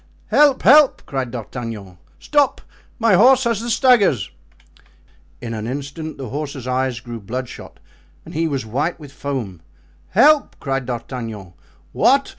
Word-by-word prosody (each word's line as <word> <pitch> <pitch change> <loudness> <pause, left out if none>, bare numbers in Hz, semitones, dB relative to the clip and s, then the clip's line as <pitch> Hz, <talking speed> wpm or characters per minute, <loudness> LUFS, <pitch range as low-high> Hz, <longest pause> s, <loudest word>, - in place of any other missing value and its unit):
"Help! 290 -3 +4
help!" 295 0 +6
cried 135 -2 -3
D'Artagnan; 115 -5 -7 0.2
"stop—my 260 -6 -1
horse 255 +7 +6
has 230 -4 0
the 235 - -4
staggers." 225 - +3 1.1
In 115 -1 -6
an 110 0 -5
instant 145 +4 -6
the 135 -4 -7
horse's 140 -2 -5
eyes 130 -1 -1
grew 120 0 -8
bloodshot 120 +5 -7 0.5
and - - -11
he 165 +1 0
was 135 -6 -3
white 145 +11 -2
with 145 -3 -11
foam. 125 - -5 0.5
"Help!" 300 - +4
cried 135 -3 -3
D'Artagnan. 115 -6 -6 0.4
"What! - - +3
135 Hz, 130 wpm, -20 LUFS, -, 1.1 s, help